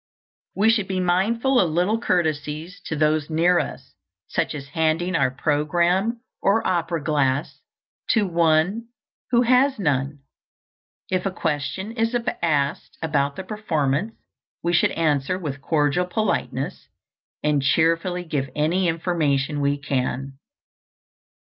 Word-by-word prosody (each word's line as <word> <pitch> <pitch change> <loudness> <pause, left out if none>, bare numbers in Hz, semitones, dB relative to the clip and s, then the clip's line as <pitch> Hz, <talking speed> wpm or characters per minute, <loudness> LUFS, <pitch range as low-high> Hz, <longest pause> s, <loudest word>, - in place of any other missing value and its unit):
We 220 +3 +4
should 210 -4 0
be 190 -1 -1
mindful 225 +9 +2
of 180 - +3
little 180 +8 +1
courtesies 160 -3 -1
to 160 - -3
those 155 0 +1
near 170 +3 +3
us, - - -6 0.3
such - - -1
as 140 -2 -8
handing 160 +4 0
our 140 -4 +3
programme 170 - +1 0.2
or 210 +3 +2
opera 170 -3 0
glass 145 -2 0 0.5
to 220 -3 +3
one 170 +5 +2 0.4
who 245 -1 +4
has 255 +3 +3
none. 140 -5 -1 0.9
If 185 +1 0
a - - -2
question 165 +5 -3
is 230 +1 0 0.2
asked 145 -4 -1
about 140 -3 0
the 190 - -6
performance, 185 -2 -1 0.5
we 170 +1 0
should 175 - +4
answer 155 +1 +1
with 145 -6 -5
cordial 150 +4 +1
politeness 215 +4 -2 0.6
and 150 -2 +2
cheerfully 165 +5 +1
give 145 -5 -2
any 170 +5 +1
information 155 -4 0
we 140 0 +1
can. 135 -1 -3
165 Hz, 125 wpm, -23 LUFS, 145-185 Hz, 0.9 s, We